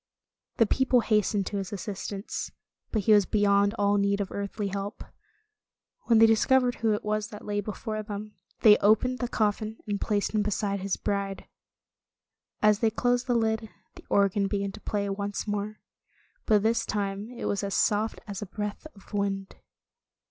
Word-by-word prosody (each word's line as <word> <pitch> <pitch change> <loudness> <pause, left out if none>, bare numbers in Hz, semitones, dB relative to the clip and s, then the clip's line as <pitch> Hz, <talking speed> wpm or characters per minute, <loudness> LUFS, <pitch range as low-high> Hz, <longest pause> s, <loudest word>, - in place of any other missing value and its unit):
The 230 - +5
people 255 +2 +3
hastened 210 -2 +1
to 205 - -3
his 195 -2 -4
assistance, 200 0 -5 0.4
but 215 -3 0
he 215 - +5
was 205 -3 +5
beyond 200 0 +3
all 205 0 +2
need. 200 0 +1
of 200 -1 -3
earthly 200 0 -3
help. 200 +2 -5 1.0
When 230 - +4
they 225 - +8
discovered 245 +3 +4
who 225 -2 +1
it 210 - -2
was 215 0 -1
that 210 -1 -10
lay 205 0 -1
before 215 +1 -4
them, 210 0 -7 0.3
they 210 -2 +8
opened 220 +5 +3
the 245 - -1
coffin 215 -1 -1
and 205 -1 -3
placed 205 -2 0
him 215 - +2
beside 205 -1 -1
his 195 0 -2
bride. 200 -1 -3 1.2
As 210 -1 +5
they 225 - +3
closed 245 +3 0
the 245 - +2
lid, 220 -1 0 0.2
the - - -14
organ 200 0 +3
began 200 -1 -2
to - - -12
play 205 -1 -2
once 200 0 -3
more. 210 +1 -3 0.7
But 210 -2 +4
this 225 +1 +2
time 200 +1 -3
it - - -5
was 200 0 -1
as 200 -1 -2
soft 215 +1 +1
as 200 -2 -6
a 210 - -5
breath 210 - -5
of 200 +2 -18
wind. 195 -1 -2
205 Hz, 175 wpm, -27 LUFS, 200-220 Hz, 1.2 s, they